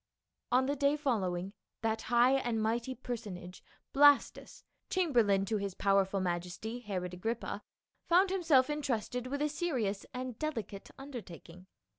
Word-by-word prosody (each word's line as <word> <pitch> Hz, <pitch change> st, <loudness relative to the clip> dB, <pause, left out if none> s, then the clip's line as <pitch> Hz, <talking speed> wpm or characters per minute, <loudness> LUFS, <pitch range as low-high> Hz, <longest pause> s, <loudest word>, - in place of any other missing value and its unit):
On 255 Hz, +1 st, +4 dB
the 285 Hz, +2 st, 0 dB
day 280 Hz, +1 st, +2 dB
following, 195 Hz, -9 st, -1 dB, 0.3 s
that 225 Hz, 0 st, 0 dB
high 240 Hz, +1 st, +5 dB
and 245 Hz, -4 st, +1 dB
mighty 235 Hz, +4 st, -1 dB
person 225 Hz, -6 st, -5 dB
age, 180 Hz, +1 st, -11 dB, 0.3 s
Blastus, 290 Hz, 0 st, +4 dB, 0.3 s
chamberlain 235 Hz, -, +3 dB
to 215 Hz, +2 st, 0 dB
his 200 Hz, -2 st, -4 dB
powerful 195 Hz, 0 st, +2 dB
majesty, 180 Hz, +6 st, -3 dB
Herod 185 Hz, -6 st, -4 dB
Agrippa, 225 Hz, +6 st, -3 dB, 0.5 s
found 370 Hz, +3 st, +4 dB
himself 320 Hz, -9 st, +4 dB
entrusted 250 Hz, -4 st, -2 dB
with 285 Hz, +3 st, -2 dB
a -, -, +3 dB
serious 255 Hz, -, -2 dB
and 250 Hz, -2 st, -5 dB
delicate 225 Hz, -10 st, -4 dB
undertaking. 185 Hz, -9 st, -10 dB
235 Hz, 135 wpm, -32 LUFS, 195-275 Hz, 0.5 s, high